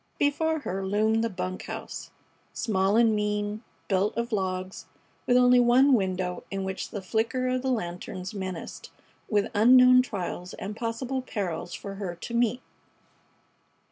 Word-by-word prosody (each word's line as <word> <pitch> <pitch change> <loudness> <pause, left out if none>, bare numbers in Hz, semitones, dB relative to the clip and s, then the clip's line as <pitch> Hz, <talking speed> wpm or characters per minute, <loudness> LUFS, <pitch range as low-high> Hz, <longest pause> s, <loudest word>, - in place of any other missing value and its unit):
Before 315 +2 +1
her 195 -6 -3
loomed 215 +3 +1
the 230 - 0
bunk 185 -1 -5
house, - - -6 0.4
small 195 -1 +1
and 230 -2 +4
mean, 210 +1 -2 0.2
built 195 +2 +1
of 235 +1 -2
logs, 185 -2 -3 0.4
with 245 - +5
only 250 0 +6
one 250 +3 +5
window 185 -4 0
in 195 -1 -3
which 190 0 -4
the 205 - -6
flicker 230 +6 0
of 255 0 0
the 265 - -1
lanterns 180 -3 -4
menaced, 185 -4 -6 0.4
with 205 -2 +1
unknown 250 +3 +7
trials 185 -6 -5
and 210 +2 -6
possible 240 +4 -3
perils 195 -9 -4
for 195 -1 -7
her 180 -3 -3
to 175 +7 -8
meet. 240 +1 +1
210 Hz, 145 wpm, -27 LUFS, 190-245 Hz, 0.4 s, unknown